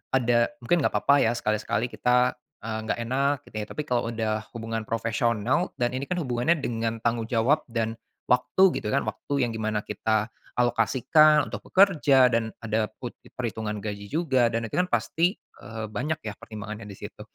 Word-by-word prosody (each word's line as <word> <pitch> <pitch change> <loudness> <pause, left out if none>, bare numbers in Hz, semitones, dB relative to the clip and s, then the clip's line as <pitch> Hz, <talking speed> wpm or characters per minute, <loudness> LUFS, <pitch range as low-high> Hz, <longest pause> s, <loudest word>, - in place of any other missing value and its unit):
ada 120 -2 +3 0.2
mungkin 175 +9 +2
nggak - - 0
papa 140 0 +4
ya 115 - +3
sekali-sekali 110 +1 -1
kita, 125 0 +2 0.3
eee, 110 0 -3
nggak - - -1
enak 135 +4 +1
gitu - - -16
ya - - -4
tapi 150 - -4
kalau 125 -4 0
udah 110 -2 -2
hubungan 115 -1 -3
profesional 115 - 0
dan 120 0 0
ini 135 +2 -3
kan 180 - -2
hubungannya 125 +3 +1
dengan 115 -3 -2
tanggung 115 -1 0
jawab 125 +7 +2
dan, 115 -2 -2 0.3
waktu 180 +9 +4
gitu 105 - -3
kan, 140 - +1
waktu 140 - -3
yang 115 - -4
di 110 - -5
mana 110 -1 -1
kita 110 +1 -1 0.2
alokasikan 130 +6 +4
untuk - - -6
bekerja 150 -9 +5
dan 115 -2 +1
ada 110 -1 -1
put 120 -2 -6 0.2
perhitungan 110 -3 -3
gaji 100 -1 -6
juga 130 -6 +2
dan 115 0 -2
itu 110 - -9
kan 180 - -2
pasti, 175 +5 +1 0.3
eee, 110 +1 -6
banyak 150 +8 -2
ya 105 - -3
pertimbangannya 110 0 -8
disitu. 100 - -9
115 Hz, 175 wpm, -26 LUFS, 110-130 Hz, 0.3 s, bekerja